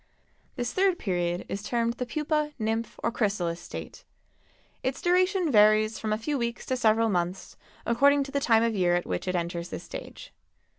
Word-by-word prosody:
This 245 Hz, 0 st, -3 dB
third 375 Hz, -1 st, +2 dB
period 175 Hz, -, -1 dB
is 200 Hz, -, -4 dB
termed 235 Hz, +2 st, 0 dB
the 250 Hz, 0 st, -5 dB
pupa, 300 Hz, +2 st, -1 dB
nymph 225 Hz, 0 st, -2 dB
or 235 Hz, -, +1 dB
chrysalis 195 Hz, -7 st, -1 dB
state. -, -, -8 dB, 0.8 s
Its 260 Hz, +1 st, -2 dB
duration 365 Hz, -1 st, +2 dB
varies 215 Hz, 0 st, +4 dB
from 215 Hz, -, -3 dB
a 215 Hz, -, +1 dB
few 280 Hz, +5 st, -2 dB
weeks 235 Hz, 0 st, -3 dB
to 260 Hz, -, -1 dB
several 225 Hz, -2 st, +3 dB
months, 180 Hz, -2 st, -2 dB, 0.3 s
according 280 Hz, +4 st, +4 dB
to 275 Hz, -, -9 dB
the 280 Hz, -, 0 dB
time 230 Hz, -4 st, +4 dB
of 230 Hz, -1 st, +1 dB
year 180 Hz, -3 st, +2 dB
at 175 Hz, -, -1 dB
which 90 Hz, -1 st, -3 dB
it 185 Hz, -, 0 dB
enters 170 Hz, 0 st, -3 dB
this -, -, -6 dB
stage. -, -, -9 dB
225 Hz, 185 wpm, -27 LUFS, 195-275 Hz, 0.8 s, varies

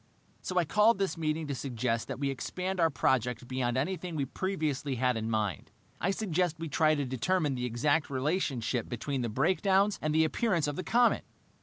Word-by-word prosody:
"So 185 Hz, -, -4 dB
I 175 Hz, -, +4 dB
called 210 Hz, +7 st, +4 dB
this 195 Hz, -1 st, -1 dB
meeting 160 Hz, -1 st, -1 dB
to 145 Hz, -, -3 dB
suggest 120 Hz, -3 st, -2 dB
that -, -, -4 dB
we 140 Hz, 0 st, -1 dB
expand 185 Hz, +7 st, -4 dB
our 165 Hz, -1 st, +4 dB
project 125 Hz, -4 st, 0 dB
beyond 130 Hz, -1 st, -1 dB
anything 180 Hz, +4 st, -2 dB
we 140 Hz, -3 st, 0 dB
previously 150 Hz, -4 st, -2 dB
had 125 Hz, 0 st, +1 dB
in 110 Hz, 0 st, -2 dB
mind. 105 Hz, -7 st, -1 dB, 0.3 s
I 180 Hz, -, 0 dB
suggest 180 Hz, -4 st, 0 dB
we 165 Hz, -1 st, -5 dB
try 155 Hz, +2 st, +3 dB
to 145 Hz, -2 st, -1 dB
determine 145 Hz, +4 st, 0 dB
the 125 Hz, -1 st, -2 dB
exact 145 Hz, +6 st, +1 dB
relationship 135 Hz, -4 st, -1 dB
between 130 Hz, +3 st, -3 dB
the 120 Hz, -, -1 dB
breakdowns 190 Hz, -, +2 dB
and 155 Hz, -, 0 dB
the 160 Hz, 0 st, +5 dB
appearance 170 Hz, -1 st, +1 dB
of 145 Hz, -1 st, -2 dB
the 185 Hz, -, -4 dB
comet." 240 Hz, +1 st, +3 dB
150 Hz, 190 wpm, -30 LUFS, 130-180 Hz, 0.3 s, the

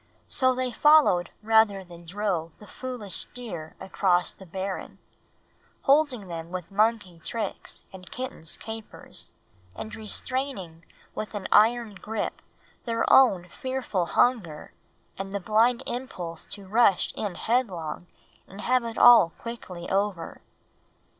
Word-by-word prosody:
So 255 Hz, -1 st, +3 dB
they 255 Hz, 0 st, -1 dB
followed 295 Hz, -, +5 dB
rather 220 Hz, -3 st, +4 dB
than 175 Hz, -1 st, -13 dB
drove 180 Hz, -4 st, -2 dB
the 210 Hz, -, -14 dB
foolish 240 Hz, -6 st, -5 dB
deer 175 Hz, -11 st, -6 dB
across 180 Hz, -2 st, +1 dB
the 190 Hz, -, -15 dB
barren, 190 Hz, +2 st, -5 dB, 0.9 s
holding 275 Hz, -7 st, +3 dB
them 165 Hz, -1 st, -6 dB
with 180 Hz, 0 st, -6 dB
monkey 205 Hz, -4 st, +1 dB
tricks 220 Hz, +1 st, -5 dB
and 185 Hz, -2 st, -11 dB
kitten's 250 Hz, -11 st, -5 dB
capers, 220 Hz, -1 st, -7 dB, 0.4 s
and 220 Hz, -, -7 dB
restraining 215 Hz, -6 st, -4 dB, 0.3 s
with 215 Hz, 0 st, -5 dB
an 200 Hz, -, -3 dB
iron 230 Hz, 0 st, +4 dB
grip 215 Hz, +3 st, -4 dB, 0.4 s
their 230 Hz, -1 st, 0 dB
own 195 Hz, -10 st, +6 dB
fearful 250 Hz, -7 st, -2 dB
hunger 190 Hz, -13 st, +1 dB, 0.5 s
and 195 Hz, 0 st, -4 dB
the 200 Hz, -, -2 dB
blind 230 Hz, +6 st, +2 dB
impulse 180 Hz, -10 st, -5 dB
to 200 Hz, -, -6 dB
rush 210 Hz, -2 st, +3 dB
in 205 Hz, -4 st, -4 dB
headlong 180 Hz, -8 st, -1 dB, 0.4 s
and 195 Hz, +2 st, -10 dB
have 255 Hz, 0 st, +2 dB
it 230 Hz, -1 st, -5 dB
all 235 Hz, -8 st, +8 dB
quickly 190 Hz, -7 st, -7 dB
over. 195 Hz, -3 st, -1 dB
210 Hz, 125 wpm, -26 LUFS, 180-240 Hz, 0.9 s, all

